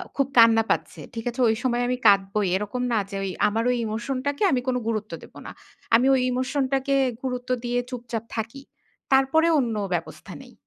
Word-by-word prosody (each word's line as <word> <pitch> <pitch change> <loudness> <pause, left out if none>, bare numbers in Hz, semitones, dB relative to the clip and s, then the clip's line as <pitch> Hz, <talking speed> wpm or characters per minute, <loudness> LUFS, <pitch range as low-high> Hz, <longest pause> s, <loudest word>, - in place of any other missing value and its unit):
খুব 275 -2 +1
কান্না 230 -1 +7
পাচ্ছে, - - -1
ঠিক 225 -1 -5
আছে? 240 - -8
ঐ - - +4
সময় 245 -1 +1
আমি 250 0 -1
কাঁদবোই। 200 0 +4
এরকম 210 +5 -3
না 230 - +2
যে, 200 - -4
ঐ - - -1 0.2
আমার 220 +2 -1
ওই 250 - +2
ইমোশনটাকে 260 - -3
আমি 255 - +1
কোন 255 - +1
গুরুত্ব 215 -1 -2
দেব - - -15
না। - - -7 0.4
আমি 240 +3 +4 0.3
ইমোশনটাকে 265 +1 -1 0.3
গুরুত্ব 250 -1 -4
দিয়ে 245 0 0
চুপচাপ 235 -3 -5
থাকি। 225 +4 -5 0.5
তারপরে 270 +5 +4
অন্য 235 -4 -1 0.2
ব্যবস্থা 175 - -5
নেই। - - -15
245 Hz, 175 wpm, -24 LUFS, 225-260 Hz, 0.5 s, কান্না